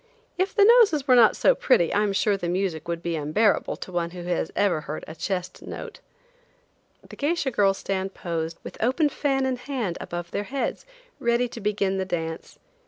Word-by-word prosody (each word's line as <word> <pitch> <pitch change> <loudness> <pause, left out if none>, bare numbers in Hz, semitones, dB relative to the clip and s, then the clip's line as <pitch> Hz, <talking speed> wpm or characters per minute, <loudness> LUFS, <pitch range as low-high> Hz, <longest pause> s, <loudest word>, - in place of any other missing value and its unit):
If 375 +2 -1
the 405 -2 +6
noses 410 - +5
were 255 - +6
not 235 -3 +6
so - - +5
pretty 175 - +2
I 205 - +3
am 210 -1 +1
sure 200 +1 +2
the 175 -3 -3
music 175 -3 -2
would 170 0 -3
be 170 -1 -1
unbearable 160 +8 +1
to - - -9
one 170 -1 -1
who 175 0 -8
has 175 -2 -2
ever 195 -6 +2
heard 155 0 -6
a 160 - -7
chest 180 +2 -4
note. - - -8 1.1
The - - -11
geisha 290 -2 0
girls 195 -3 +2
stand 190 0 -3
posed 165 -1 -3
with - - -9
open 275 +6 +2
fan 270 -2 0
in 260 -1 -1
hand 245 -9 -3
above 175 0 -6
their 205 - -2
heads, 275 - -3 0.3
ready 235 +1 +1
to 230 - -9
begin 200 -2 0
the 190 - -1
dance. 165 -3 -4
195 Hz, 195 wpm, -25 LUFS, 175-255 Hz, 1.1 s, the